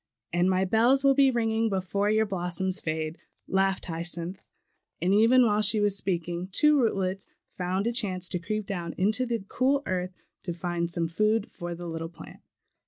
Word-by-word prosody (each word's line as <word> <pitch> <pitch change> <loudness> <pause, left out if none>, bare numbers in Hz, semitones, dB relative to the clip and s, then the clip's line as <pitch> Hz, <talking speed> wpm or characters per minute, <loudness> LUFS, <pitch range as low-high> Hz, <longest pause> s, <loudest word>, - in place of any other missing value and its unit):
"And 175 +2 +2
my 190 0 +2
bells 240 +7 +3
will 275 0 +6
be 275 0 +5
ringing, 225 -2 +1
before 200 +1 -1
your 220 +1 +3
blossoms 185 -1 -1
fade," 155 0 -3 0.3
laughed 195 0 +1
Hyacinth; 170 +2 -4 0.6
and 185 +2 +1
even 235 +4 +5
while 210 -1 +2
she 215 +1 +2
was 205 -1 +2
speaking, 175 -2 -2
two 300 +9 +4
rootlets 195 -4 -1 0.2
found 185 +2 -2
a 235 - +1
chance 185 -6 0
to 180 - -2
creep 215 +4 -3
down 175 -4 -4
into 215 +7 +2
the 230 -4 -2
cool 275 +4 +1
earth 185 0 -3 0.3
to 175 - -4
find 170 0 -2
some 170 -1 0
food 215 +6 0
for 175 0 -6
the 175 +1 -8
little 165 0 -5
plant. 170 - -13
190 Hz, 175 wpm, -27 LUFS, 175-220 Hz, 0.6 s, will